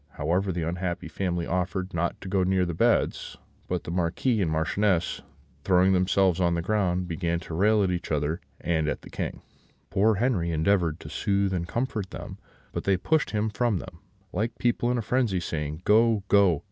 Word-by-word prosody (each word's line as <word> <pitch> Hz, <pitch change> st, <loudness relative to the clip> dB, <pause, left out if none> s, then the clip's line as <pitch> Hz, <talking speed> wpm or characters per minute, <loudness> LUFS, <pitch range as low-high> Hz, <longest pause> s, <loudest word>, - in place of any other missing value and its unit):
However, 90 Hz, +6 st, 0 dB
the 85 Hz, -2 st, -2 dB
unhappy 90 Hz, 0 st, -3 dB
family 90 Hz, 0 st, -2 dB
offered 95 Hz, +2 st, -2 dB
not 85 Hz, +1 st, -1 dB
to -, -, -8 dB
go 95 Hz, 0 st, +1 dB
near 95 Hz, 0 st, +2 dB
the 85 Hz, -, -3 dB
beds; -, -, +1 dB, 0.3 s
but 90 Hz, -2 st, -2 dB
the -, -, -6 dB
Marquis 90 Hz, +7 st, 0 dB
and 85 Hz, -, +1 dB
Marchioness, 90 Hz, +3 st, 0 dB, 0.4 s
throwing 95 Hz, 0 st, +4 dB
themselves 95 Hz, 0 st, +2 dB
on 85 Hz, -1 st, +2 dB
the 85 Hz, -, -1 dB
ground, 90 Hz, -3 st, 0 dB
began 85 Hz, -1 st, -1 dB
to 80 Hz, -, -8 dB
rail 105 Hz, +4 st, +3 dB
at 95 Hz, -, +1 dB
each 90 Hz, -2 st, -3 dB
other 75 Hz, +3 st, -1 dB, 0.2 s
and 80 Hz, -2 st, 0 dB
at 75 Hz, -, -2 dB
the -, -, -12 dB
King. -, -, -4 dB, 0.5 s
Poor 105 Hz, +2 st, +3 dB
Henri 100 Hz, -6 st, +1 dB
endeavoured 85 Hz, 0 st, +1 dB
to -, -, -9 dB
soothe 100 Hz, -2 st, 0 dB
and 85 Hz, -2 st, -2 dB
comfort 110 Hz, -3 st, -2 dB
them; -, -, -8 dB, 0.3 s
but -, -, -4 dB
they 100 Hz, -1 st, +3 dB
pushed 155 Hz, -, +1 dB
him 110 Hz, 0 st, -1 dB
from 115 Hz, -2 st, +1 dB
them, 85 Hz, -, -9 dB, 0.3 s
like 115 Hz, +5 st, -2 dB
people 120 Hz, 0 st, +1 dB
in 125 Hz, -, +1 dB
a 115 Hz, -, -2 dB
frenzy, 115 Hz, -4 st, +1 dB
saying, 75 Hz, -1 st, -4 dB
'Go, 110 Hz, -1 st, +4 dB
go! 100 Hz, -6 st, +5 dB
90 Hz, 190 wpm, -26 LUFS, 85-105 Hz, 0.5 s, go